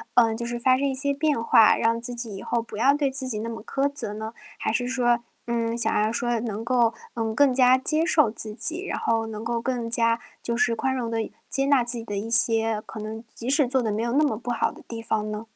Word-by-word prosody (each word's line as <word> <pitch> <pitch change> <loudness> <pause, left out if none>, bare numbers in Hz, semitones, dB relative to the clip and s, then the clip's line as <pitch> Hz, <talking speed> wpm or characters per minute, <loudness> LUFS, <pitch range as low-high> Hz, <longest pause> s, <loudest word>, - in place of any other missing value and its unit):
呃， 225 -2 +4
就 235 +1 -4
是 240 0 -4
发 255 +1 +4
生 280 +1 0
一 270 - -1
些 280 +1 0
变 290 -4 0
化， 230 -1 +6
让 230 +1 +1
自 245 +1 -6
己 230 -4 -6
以 195 - -7
后 235 - -1
不 225 - -9
要 270 +6 +4
对 290 -2 +1
自 265 0 -4
己 215 -4 -3
那 230 +1 -4
么 225 - -6
苛 275 +1 0
责 220 -7 -5
呢？ 220 +1 -6 0.3
还 - - -1
是 245 +2 -1
说， 245 -2 +2 0.3
嗯， 230 -1 -1
想 235 - +1
要 215 - +1
说 240 0 -1
能 220 -1 -4
够， 235 -2 +2 0.2
嗯， 225 -1 -2
更 270 +2 +4
加 255 0 +5
接 310 +5 +1
受 305 -9 +4
自 215 -1 -6
己， 335 - 0
然 290 - -3
后 225 -1 0
能 220 0 -6
够 235 0 -2
更 240 -1 -2
加 230 0 +2 0.2
就 235 - -2
是 235 -1 +2
宽 265 +3 -1
容 240 -3 -2
地 225 -1 -1
一 - - -9 0.2
接 270 -1 0
纳 280 -4 +4
自 240 +1 0
己 230 - -6
的 205 -3 -5
一 220 +3 -4
些 225 -1 +4
可 220 - -8
能 220 +2 -6
即 240 +2 -6
使 280 -2 +3
做 260 0 +1
得 220 - -1
没 215 +2 -1
有 235 - -1
那 300 +2 +4
么 220 -7 -1
不 240 +1 -5
好 230 - 0
的 - - -15
地 230 -1 -6
方 215 -2 -2
呢？ 210 +2 -5
235 Hz, 290 characters per minute, -25 LUFS, 225-260 Hz, 0.3 s, 化